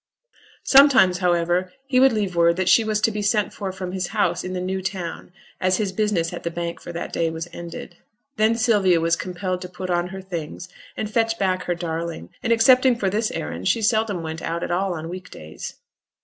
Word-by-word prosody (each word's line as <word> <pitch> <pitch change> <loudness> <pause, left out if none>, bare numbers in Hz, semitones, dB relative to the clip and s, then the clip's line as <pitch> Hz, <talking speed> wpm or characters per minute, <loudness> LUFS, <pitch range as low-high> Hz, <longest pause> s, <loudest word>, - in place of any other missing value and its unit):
Sometimes, 265 -10 +6
however, 175 0 +1
he 265 -2 +2
would 265 +1 +6
leave 205 -5 -1
word 170 0 +4
that 185 0 -1
she 225 - +6
was 215 -1 0
to 225 - +3
be 210 0 -3
sent 205 -1 +1
for 195 -2 -4
from 185 -1 -6
his 185 -1 -2
house 210 +2 0
in 185 - -5
the 185 - -2
New 190 +1 -2
Town, 185 -3 -5 0.3
as 185 0 +2
his 205 -3 -1
business 190 -5 0
at - - -6
the 170 - -2
Bank 170 0 -5
for - - -8
that 170 - -6
day 165 -1 +1
was 160 +1 -5
ended. 175 0 -8 0.4
Then 220 0 +3
Sylvia 205 -7 +3
was 165 +1 +2
compelled 185 0 -4
to 180 - -7
put 185 0 -5
on 175 0 +1
her 190 +1 -8
things, 175 -1 -6 0.3
and 215 - -2
fetch 225 +1 0
back 185 -2 0
her 175 - 0
darling; 165 - -4
and 235 - -1
excepting 250 +2 +5
for 195 -5 -1
this 215 +2 0
errand 85 +4 -4
she 225 - +2
seldom 215 -5 +1
went 160 0 -5
out 170 +1 -3
at - - -3
all 185 +1 0
on 160 0 -6
week 185 +2 -8
days. 80 0 -9
185 Hz, 220 wpm, -23 LUFS, 170-210 Hz, 0.4 s, Sometimes